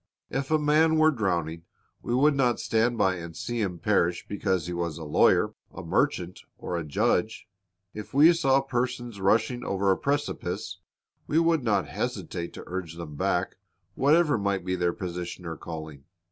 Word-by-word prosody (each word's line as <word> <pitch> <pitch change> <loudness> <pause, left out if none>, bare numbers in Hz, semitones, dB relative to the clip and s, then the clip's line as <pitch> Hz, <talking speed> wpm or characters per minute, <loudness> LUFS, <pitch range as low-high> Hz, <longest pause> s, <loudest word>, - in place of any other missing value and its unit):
If 135 +1 -2
a 155 - +4
man 155 +2 +3
were 155 0 +5
drowning, 85 - -2 0.4
we 120 - -1
would 145 +4 +4
not 125 -3 +2
stand 115 +1 +1
by 95 -3 +2
and 85 -1 -8
see 120 -1 -3
him 95 -4 -2
perish 90 -3 +1
because 95 -4 -1
he 90 - -4
was 85 -3 -3
a 80 - -7
lawyer, 75 - +3 0.2
a - - -8
merchant, 90 0 0 0.2
or 90 - -4
a 85 - -2
judge. 110 +8 0 0.5
If 105 -1 -8
we 150 +5 +7
saw 135 -4 +3
persons 120 -4 -3
rushing 115 +5 +2
over 100 0 +1
a 95 - +2
precipice, 145 +1 -2 0.5
we 155 - +1
would 165 -3 +3
not 105 -5 +1
hesitate 85 -1 -4
to - - -9
urge 90 -3 -5
them 85 -3 -8
back, 90 +2 -1 0.4
whatever 150 - +3
might 100 -2 -1
be 90 0 0
their 90 -1 +1
position 90 -2 -6
or 85 -1 -4
calling. 80 -3 -8
100 Hz, 175 wpm, -27 LUFS, 85-130 Hz, 0.5 s, we